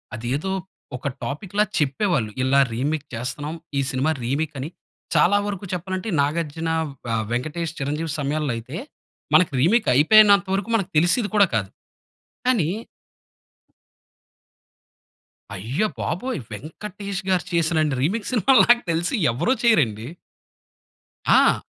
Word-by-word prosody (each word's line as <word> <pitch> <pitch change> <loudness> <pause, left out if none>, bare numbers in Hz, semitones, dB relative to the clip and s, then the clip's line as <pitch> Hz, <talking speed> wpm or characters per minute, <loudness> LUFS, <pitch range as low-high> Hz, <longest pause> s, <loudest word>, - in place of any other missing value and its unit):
అది 115 +2 -6
ఏదో 190 +5 -4 0.5
ఒక 140 - -5 0.2
టాపిక్‌లా 195 +8 -1 0.2
చెప్పేవాళ్ళు. 140 - 0
"ఇలా 135 +2 +3
రీమిక్ 145 +4 -2
చేస్తున్నాం, 145 +7 -4 0.2
ఈ - - +2
సినిమా 135 +4 +1
రీమీక్" 145 +4 -2
అని. 145 +5 -4 0.5
చాలా 175 +6 +5
వరకు 200 -1 -4
చెప్పాలంటే 185 +4 -3
'నాగార్జున' 160 +2 -1 0.4
ఆహ్, 110 -1 -1
'వెంకటేష్', 155 +6 -3
'చిరంజీవి' 150 +3 -2
సమయాల్లో 145 -2 -1
అయితే, 130 +8 -7 0.6
మనకు 180 -4 +5
రీమీక్ 215 - +3
అయిపోయినంత 200 +5 +6
వరకు 200 +3 -3
మనకు 195 -5 0
తెలిసేది 180 +7 +2
కూడా 200 -1 +7
కాదు. 100 -3 -1 0.8
కానీ 210 -11 +2 2.9
అయ్య 120 - -1
బాబోయ్! 245 - -2
'వెంకటేష్‌గారు' 185 - -4
చేసినన్ని 160 -4 +1
రీమిక్స్ 205 - -1
సినిమాలు 250 +3 +5
నాకు 240 0 +6
తెలిసి 170 +8 -1 0.2
ఎవరు 180 - +1
చేయరండి. 115 - +2 1.2
ఆ! - - +5
160 Hz, 115 wpm, -23 LUFS, 140-200 Hz, 2.9 s, కూడా